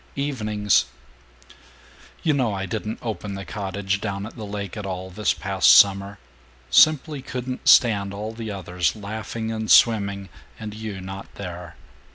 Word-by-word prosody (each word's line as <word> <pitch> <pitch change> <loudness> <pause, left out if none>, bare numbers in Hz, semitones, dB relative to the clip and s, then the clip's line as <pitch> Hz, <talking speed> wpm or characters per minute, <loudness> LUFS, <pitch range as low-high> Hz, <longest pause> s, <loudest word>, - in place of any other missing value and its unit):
Evenings 110 -8 +1 1.4
You 155 - +3
know 125 -7 0
I 95 0 -3
didn't 110 +3 -4
open 105 -3 -4
the 100 0 -7
cottage 100 -1 -3
down 100 -2 -3
at 110 - -10
the 110 -3 -7
lake 100 -2 -5
at 105 - -5
all, 95 -1 -5
this 105 +3 0
past 95 +4 +3
summer. 100 0 +5 0.5
Simply 155 -2 +4
couldn't 130 -1 -6
stand 100 -5 +5
all 105 +2 -5
the 115 -1 -7
others 90 -3 -2
laughing 110 +2 -5
and 110 -1 -4
swimming, 100 -4 +4 0.3
and 105 -1 -6
you 105 -3 -6
not 95 +1 -8
there. 90 -3 -8
105 Hz, 150 wpm, -23 LUFS, 100-110 Hz, 1.4 s, summer